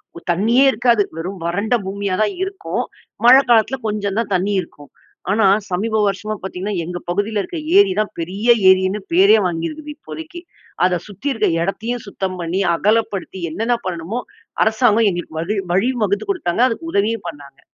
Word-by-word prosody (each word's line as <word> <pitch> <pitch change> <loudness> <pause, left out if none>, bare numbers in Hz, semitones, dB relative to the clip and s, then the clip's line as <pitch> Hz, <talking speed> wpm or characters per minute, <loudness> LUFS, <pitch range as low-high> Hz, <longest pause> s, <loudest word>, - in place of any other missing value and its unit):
ஒ - - -8
தண்ணீயே 230 +9 +3
இருக்காது, 235 -1 +2 0.2
வெறும் 185 +4 -5
வறண்ட 200 +8 0
பூமியா 200 -1 -2
தான் 210 - +1
இருக்கும். 390 0 -3 0.4
மழ 245 - +9 0.2
காலத்துல 235 +3 +4
கொஞ்சம் 205 -1 -2
தான் 210 -3 -3
தண்ணீ 195 +3 0
இருக்கும். 145 -4 -14 0.4
ஆனா 215 0 +3 0.3
சமீப 215 +5 -1
வருஷமா 210 +2 -2
பார்த்தீங்கன்னா, 190 +2 -4
எங்க 175 +1 -5
பகுதில 205 +3 0
இருக்க 345 - -7 0.2
ஏரி 400 -1 +6
தான் 215 - -4
பெரிய 195 +7 -4 0.2
ஏரின்னு 190 +2 +3
பேரே 195 +5 +6
வாங்கியிருக்குது 295 - -4
இப்போதைக்கு. 320 +3 -9 0.4
அத 180 -2 +1
சுத்தி 205 +8 -5
இருக்க 225 - +1 0.2
எடத்தையும் 225 +5 -3
சுத்தம் 190 -2 -4
பண்ணி, 175 +3 -1
அகலப்படுத்தி 205 -1 -1
என்னென்ன 230 +8 0
பண்ணணுமோ, 180 +7 -4 0.4
அரசாங்கம் 220 0 +3
எங்களுக்கு 175 -2 -5
வகி 200 +5 -2 0.2
வழி 195 +7 +2 0.2
வகுத்து 200 +1 -2
கொடுத்தாங்க. 240 - -1
அதுக்கு 330 +8 -5
உதவியும் 205 -1 0
பண்ணாங்க! 140 -3 -13
205 Hz, 155 wpm, -19 LUFS, 185-230 Hz, 0.4 s, மழ